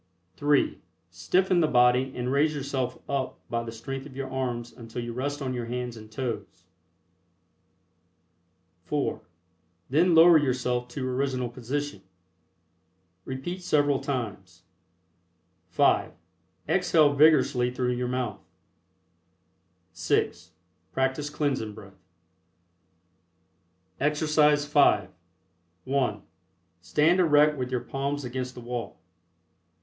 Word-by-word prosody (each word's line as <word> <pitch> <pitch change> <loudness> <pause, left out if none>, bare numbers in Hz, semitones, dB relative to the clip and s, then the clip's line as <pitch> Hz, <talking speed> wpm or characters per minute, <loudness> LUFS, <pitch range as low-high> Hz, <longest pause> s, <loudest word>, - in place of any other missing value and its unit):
(3) 145 0 +1 0.3
Stiffen 175 - +1
the 160 - +3
body 125 0 +3
and 125 0 -2
raise 150 +2 +2
yourself 135 -3 -3
up 135 -2 -2
by 115 0 0
the 115 - -6
strength 135 +5 -6
of 135 - -14
your 135 -1 -5
arms 120 -3 -3
until 115 0 -8
you 120 0 -5
rest 145 +3 -3
on 130 -1 -2
your 120 -2 -4
hands 125 0 -4
and 110 -1 -12
toes 125 0 -5 2.2
(4) - - -2 0.7
Then 165 +4 +4
lower 165 0 +8
yourself 125 -3 -1
to 130 +1 -4
original 130 -1 -1
position. 140 +5 -4 1.2
Repeat 155 +8 -5
several 145 -5 +2
times. 100 -9 -5 1.0
(5) - - +2 0.5
Exhale 155 -3 +3
vigorously 140 -4 +4
through 125 0 -1
your 125 0 -2
mouth. 125 0 -3 1.5
(6) - - -1 0.4
Practice 135 +3 -1
Cleansing 135 -8 -2
Breath. 95 -3 -14 2.0
EXERCISE 150 0 +3
V. 145 -10 +3 0.7
(1) 135 -1 -1 0.6
Stand 150 - +2
erect 150 -3 +5
with 125 -2 -3
your 125 -2 -1
palms 140 +1 -3
against 125 +1 -4
the 125 - -9
wall. 120 0 -5
130 Hz, 105 wpm, -27 LUFS, 125-145 Hz, 2.2 s, lower